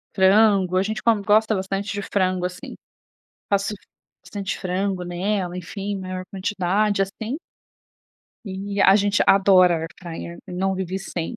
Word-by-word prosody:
frango, 195 -1 +4
a 185 - +3
gente 215 +2 -3
come 225 -3 +2
gosta 215 +1 +3
bastante 195 +2 -3
de 205 - -3
frango, 185 -2 0
assim, 180 0 -6 0.8
faço 200 +1 +1 0.5
bastante 200 -2 -4
frango 185 0 -2
nela, 180 +1 -2
enfim, 200 +3 -5
maior 185 -1 -5
quantidade, 200 +1 0
assim. 220 +7 -4 1.1
E 200 +1 -4
a 195 - +7
gente 205 0 +3
adora 190 -3 +6
air 165 0 -4
fryer, 170 0 -7
não 190 +2 -1
vive 190 0 -3
sem. 190 +3 -5
195 Hz, 135 wpm, -23 LUFS, 185-205 Hz, 1.1 s, a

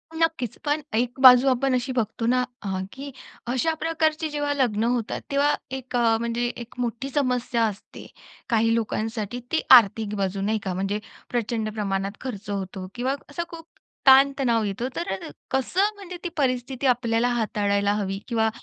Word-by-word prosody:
नक्कीच 320 -8 0
पण 295 +1 +1
एक 245 +3 -1
बाजू 255 0 +9
आपण 260 +1 +1
अशी 250 +1 -1
बघतो 230 -1 -2
ना 250 +2 +3 0.2
अ, - - -6 0.3
की 280 +1 -8 0.4
अशा 260 +7 +1
प्रकारचे 315 -1 0
जेव्हा 290 -1 -1
लग्न 240 -6 +1
होतात 235 -1 -1
तेव्हा 285 +1 +3 0.2
एक 260 -1 -8
अ, 230 -2 +3
म्हणजे 235 +1 -1
एक 235 0 -9
मोठी 245 +2 -2
समस्या 250 -4 0
असते, 210 -2 -7 0.4
काही 225 -1 +3
लोकांसाठी 225 0 -2
ती 320 - +2 0.2
आर्थिक 215 -1 +1
बाजू, 195 -1 -2
नाही 215 +2 0
का, 190 - -2
म्हणजे 195 +3 -1 0.3
प्रचंड 230 -2 -1
प्रमाणात 195 -2 -2
खर्च 225 -5 -6
होतो 190 -2 -4
किंवा 255 +3 -1
असा 315 +4 -3
खूप 330 -1 -10 0.4
ताण-तणाव 265 -3 +5
येतो. 210 +4 -2
तर 195 - -4 0.2
कसं 370 - +1
म्हणजे 370 -3 -9
ती 350 - -2
परिस्थिती 260 -1 0
आपल्याला 240 -1 +2
हाताळायला 205 -3 +1
हवी? 195 -2 -2
किंवा 225 -2 +1
240 Hz, 160 wpm, -24 LUFS, 215-270 Hz, 0.4 s, बाजू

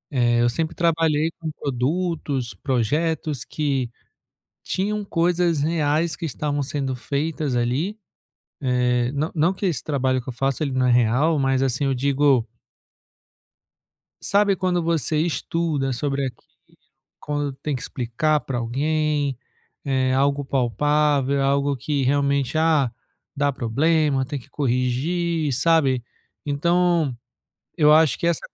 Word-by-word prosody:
Eh, 120 -2 +3
eu 120 - +4
sempre 160 +7 -2
trabalhei 165 -2 +1
com 160 - -5
produtos, 140 - -2
projetos, 145 - -1
que 135 -4 -2 0.7
tinham 210 +2 -2
coisas 170 -3 +1
reais 155 +1 +1
que 170 - -5
estavam 145 0 -2
sendo 135 -1 -2
feitas 145 +2 -2
ali, 130 - 0 0.9
eh, 125 0 +1
nã 145 +3 -1
não 165 +4 +2
que 195 +1 -2
esse 155 -9 -2
trabalho 130 -3 0
que 125 - -9
eu - - -5
faço 135 +5 -1
ele 140 - -2
não 130 -1 +1
é - - +4
real, 125 +7 +3
mas, 135 -1 +1
assim, 135 +1 0
eu 135 - +1
digo 135 -2 +2 1.7
sabe 200 0 +3
quando 180 -1 0
você 165 -2 0
estuda 160 -4 -1
sobre 140 +2 -1
aquilo, 130 - -8 0.7
quando 145 -1 -3
tem 140 +2 -4
que 125 - -6
explicar 135 +5 0
para 130 - -4
alguém, 145 +3 0 0.5
eh, 130 -2 +1
algo 140 +2 +1
palpável, 140 +2 +1
algo 140 +1 +1
que 140 +2 -1
realmente, 140 +1 +1
ah, 155 -6 +3 0.4
dá 145 0 +1
problema, 140 +3 +1
tem 145 +1 -4
que 130 - -18
corrigir, 145 +5 0
sabe? 135 -3 +2 0.4
Então 170 0 +1 0.6
eu 150 -3 +5
acho 155 -2 +4
que - - -2
essa 170 -2 +1
145 Hz, 130 wpm, -23 LUFS, 130-160 Hz, 1.7 s, eu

